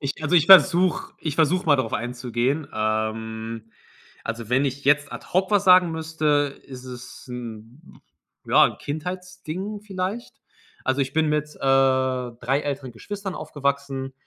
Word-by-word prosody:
Ich 140 Hz, +1 st, -4 dB
also, 155 Hz, +3 st, 0 dB
ich 165 Hz, 0 st, +4 dB
versuche 185 Hz, -1 st, +6 dB
ich 155 Hz, -3 st, -3 dB
versuche 165 Hz, +4 st, +2 dB
mal 145 Hz, -2 st, +5 dB
darauf 130 Hz, -4 st, -2 dB
einzugehen. 125 Hz, +4 st, -2 dB
Ähm, 110 Hz, +1 st, -3 dB, 0.5 s
also, 115 Hz, -1 st, -5 dB
wenn 130 Hz, +3 st, +2 dB
ich 140 Hz, +1 st, -3 dB
jetzt 145 Hz, 0 st, +3 dB
ad -, -, -8 dB
hoc 185 Hz, +2 st, +1 dB
was 205 Hz, -1 st, +3 dB
sagen 180 Hz, -2 st, +6 dB
müsste, 155 Hz, -3 st, -1 dB
ist 130 Hz, -1 st, -10 dB
es 125 Hz, -1 st, -10 dB
'n 120 Hz, +4 st, -10 dB, 0.5 s
ja, -, -, +6 dB
'n -, -, -7 dB
Kindheitsding 185 Hz, +5 st, -6 dB
vielleicht. 200 Hz, +3 st, -5 dB, 0.5 s
Also, 130 Hz, +1 st, 0 dB
ich 135 Hz, 0 st, -1 dB
bin 160 Hz, -1 st, +2 dB
mit, 150 Hz, 0 st, -1 dB
äh, -, -, -18 dB
3 130 Hz, -1 st, +1 dB
älteren 140 Hz, -3 st, -4 dB
Geschwistern 195 Hz, -, -6 dB
aufgewachsen. 140 Hz, -3 st, -3 dB
140 Hz, 145 wpm, -24 LUFS, 125-165 Hz, 0.5 s, versuche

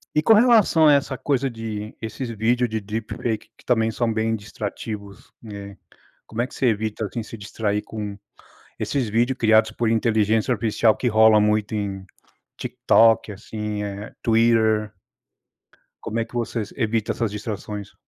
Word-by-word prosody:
e 150 Hz, -, +4 dB
com 220 Hz, -, +6 dB
relação 215 Hz, -9 st, +5 dB
a 145 Hz, -, +7 dB
essa 140 Hz, -2 st, +1 dB
coisa 135 Hz, -2 st, 0 dB
de 110 Hz, -2 st, -6 dB
esses 115 Hz, +3 st, -5 dB
vídeos 115 Hz, +2 st, +1 dB
de 110 Hz, -1 st, -2 dB
deep 110 Hz, +2 st, -5 dB
fake 110 Hz, -3 st, -3 dB
que -, -, -22 dB
também 115 Hz, -2 st, +2 dB
são 115 Hz, 0 st, 0 dB
bem 110 Hz, +1 st, 0 dB
distrativos, 105 Hz, -1 st, -7 dB
né? 100 Hz, -2 st, -9 dB, 0.5 s
Como 110 Hz, +1 st, -3 dB
é 125 Hz, -, -1 dB
que -, -, -14 dB
você 130 Hz, -, +1 dB
evita, 110 Hz, 0 st, -1 dB
assim, 115 Hz, +3 st, -4 dB
se 115 Hz, +1 st, -9 dB
distrair 105 Hz, 0 st, -2 dB
com 105 Hz, -2 st, -6 dB, 0.6 s
esses 130 Hz, -6 st, -1 dB
vídeos 120 Hz, +4 st, +1 dB
criados 110 Hz, -1 st, +4 dB
por 120 Hz, -, -1 dB
inteligência 110 Hz, 0 st, +2 dB
artificial 110 Hz, -1 st, +2 dB
que 125 Hz, -, -3 dB
rola 110 Hz, -1 st, +6 dB
muito 105 Hz, 0 st, +1 dB
em 100 Hz, -2 st, -3 dB, 0.5 s
TikTok, 115 Hz, -1 st, +3 dB
assim, 105 Hz, 0 st, -5 dB
eh, 100 Hz, +1 st, -6 dB
Twitter. 110 Hz, -2 st, +2 dB, 1.1 s
Como 115 Hz, -, -3 dB
é 115 Hz, -, -1 dB
que 120 Hz, -, -22 dB
vocês 115 Hz, -3 st, -3 dB
evita 115 Hz, -3 st, 0 dB
essas 115 Hz, -3 st, -2 dB
distrações? 105 Hz, -1 st, -6 dB
110 Hz, 160 wpm, -23 LUFS, 105-115 Hz, 1.1 s, a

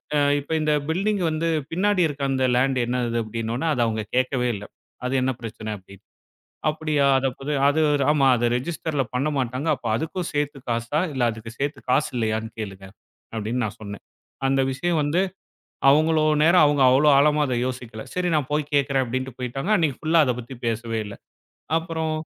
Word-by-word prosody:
அ, -, -, +3 dB, 0.2 s
இப்ப 145 Hz, +3 st, -10 dB
இந்த 150 Hz, 0 st, +2 dB, 0.2 s
பில்டிங் 195 Hz, +3 st, 0 dB
வந்து 155 Hz, +1 st, -1 dB, 0.3 s
பின்னாடி 195 Hz, +1 st, +2 dB
இருக்க 140 Hz, -1 st, -5 dB
அந்த 130 Hz, -1 st, 0 dB
லேண்ட் 130 Hz, +1 st, +2 dB
என்னது?" 120 Hz, -1 st, -1 dB
அப்டின்னொன்ன, 115 Hz, +7 st, -3 dB
அத 125 Hz, -, 0 dB
அவங்க 110 Hz, -1 st, -2 dB
கேக்கவே 125 Hz, -1 st, +1 dB
இல்ல, 105 Hz, +1 st, -7 dB, 0.4 s
அது 125 Hz, -, -1 dB
என்ன 130 Hz, +1 st, +1 dB
பிரச்சன 110 Hz, -1 st, -5 dB
அப்டின்னு. 100 Hz, +1 st, -17 dB, 0.7 s
"அப்டியா, 150 Hz, -2 st, 0 dB
அது 135 Hz, 0 st, +1 dB
அப்பத 135 Hz, +3 st, -7 dB, 0.2 s
அது 155 Hz, +2 st, +1 dB, 0.3 s
ஆமா 140 Hz, -3 st, +3 dB
அது 120 Hz, 0 st, +1 dB
ரெஜிஸ்டர்ல 150 Hz, 0 st, -2 dB
பண்ண 140 Hz, +4 st, 0 dB
மாட்டாங்க. 130 Hz, +5 st, -2 dB
அப்ப -, -, -10 dB
அதுக்கும் 165 Hz, +4 st, -3 dB
சேத்து 145 Hz, -1 st, -1 dB
காசா, 115 Hz, +6 st, 0 dB
இல்ல 130 Hz, -, -2 dB
அதுக்கு 110 Hz, +1 st, -9 dB
சேத்து 140 Hz, +1 st, -2 dB
காசு 145 Hz, +4 st, +2 dB
இல்லயான்னு 110 Hz, 0 st, -2 dB
கேளுங்க" 95 Hz, -2 st, -7 dB, 0.5 s
அப்டின்னு 115 Hz, +3 st, -1 dB
நான் 105 Hz, +1 st, -8 dB
சொன்னேன். 100 Hz, -1 st, -8 dB, 0.4 s
அந்த 135 Hz, 0 st, +2 dB
விஷயம் 165 Hz, +5 st, 0 dB
வந்து, 150 Hz, +5 st, +1 dB, 0.7 s
அவ்வளோ 155 Hz, +2 st, +4 dB, 0.2 s
நேரம், 165 Hz, +1 st, +6 dB
அவங்க 145 Hz, -1 st, +2 dB
அவ்ளோ 135 Hz, +4 st, +4 dB
ஆழமா 150 Hz, +1 st, +4 dB, 0.2 s
யோசிக்கல. 120 Hz, -4 st, -5 dB
சரி 180 Hz, 0 st, -1 dB
நான் 150 Hz, -4 st, +1 dB
போய்க் 150 Hz, -1 st, -1 dB
கேக்குறேன், 140 Hz, -1 st, +2 dB
அப்டின்னுட்டு 130 Hz, +1 st, -4 dB
போய்ட்டாங்க. 130 Hz, -, -4 dB
அன்னைக்கு 160 Hz, -9 st, +1 dB
ஃபுல்லா 165 Hz, +1 st, +2 dB
அத 125 Hz, -, +2 dB
பத்தி 125 Hz, +2 st, -9 dB
பேசவே 115 Hz, 0 st, -2 dB
இல்ல. 100 Hz, -, -8 dB, 0.6 s
அப்புறம் 160 Hz, -1 st, -2 dB
135 Hz, 170 wpm, -24 LUFS, 115-155 Hz, 0.7 s, நேரம்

